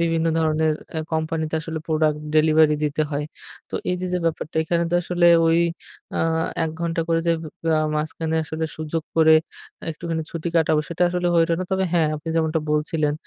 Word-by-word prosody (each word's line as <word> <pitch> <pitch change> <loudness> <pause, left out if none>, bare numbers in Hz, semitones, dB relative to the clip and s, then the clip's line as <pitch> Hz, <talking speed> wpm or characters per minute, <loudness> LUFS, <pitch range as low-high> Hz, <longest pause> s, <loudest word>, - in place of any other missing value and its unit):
বিভিন্ন 165 -1 +1
ধরনের 155 -1 +2 0.2
এ - - +1
কোম্পানিতে 160 0 -1
আসলে 160 -1 -5
প্রোডাক্ট 155 -1 +1 0.2
ডেলিভারি 155 0 +5
দিতে 150 +1 0
হয়। 145 0 -2 0.5
তো - - -7 0.2
এই - - +1
যে 185 - -2
যে 180 - +1
ব্যাপারটা, 160 -1 -2
এখানে 170 +1 0
তো - - 0
আসলে 175 0 +2 0.2
ওই 165 +1 +4 0.6
আ - - 0 0.5
১ 160 - -2
ঘণ্টা 170 0 -1
করে 165 0 +2
যে 170 - +4 0.4
আ - - +3 0.2
মাঝখানে 160 +1 -2
আসলে 160 +1 -3
সুযোগ 155 +1 -3
করে 160 -1 +6 0.6
একটুখানি 165 0 -3
ছুটি 165 0 -4
কাটাবো 160 -1 +3
সেটা 170 +1 -2
আসলে 175 0 -1
হয়ে 165 - +5
উঠে 170 - +1
না। - - -1
তবে 190 0 +1
হ্যাঁ, 165 -3 +3
আপনি 150 +2 -8
যেমনটা 160 0 +1
বলছিলেন 150 0 +1
160 Hz, 185 wpm, -23 LUFS, 155-165 Hz, 0.6 s, করে